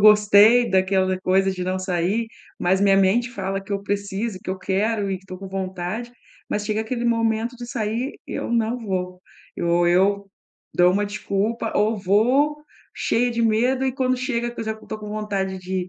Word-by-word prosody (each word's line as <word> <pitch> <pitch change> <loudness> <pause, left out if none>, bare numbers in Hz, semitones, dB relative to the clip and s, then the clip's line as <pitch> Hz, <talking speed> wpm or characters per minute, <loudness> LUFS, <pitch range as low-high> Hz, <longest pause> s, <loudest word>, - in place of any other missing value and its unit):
gostei 210 +3 +6
daquela 190 0 +2
coisa 190 +1 +2
de 180 -1 -4
não 185 0 -1
sair, 185 +5 -1 0.3
mas 185 +2 +2
minha 195 -1 +5
mente 220 +6 +3
fala 195 -3 -3
que 200 - -7
eu 200 0 -2
preciso, 200 +1 -3
que - - -5
eu 185 - -3
quero 200 +2 0
e 190 - -2
que 190 - -24
tô 185 -1 -8
com 195 0 -8
vontade, 190 +5 -4 0.4
mas 210 0 -2
chega 215 0 0
aquele 240 +1 -3
momento 230 +1 0
de 240 0 -8
sair 235 +2 -2
e - - -7
eu - - -3
não 230 +1 +1
vou, 185 -4 -4 0.3
eu 170 - -2
ou 175 0 +3
eu 195 +2 +2 0.4
dou 180 +1 +5
uma 205 +1 +1
desculpa 205 +2 -2
ou 215 +2 +2
vou 245 +10 +3 0.4
cheia 245 +1 0
de 235 0 -2
medo 245 +4 +2
e 260 - 0
quando 255 -1 0
chega, 240 -2 -2
que 240 - -8
eu - - -3
já 220 - -1
não 220 - -16
tô 215 - -5
com 210 -1 -8
vontade 200 -3 -3
de 185 0 -3
205 Hz, 200 wpm, -23 LUFS, 190-230 Hz, 0.4 s, gostei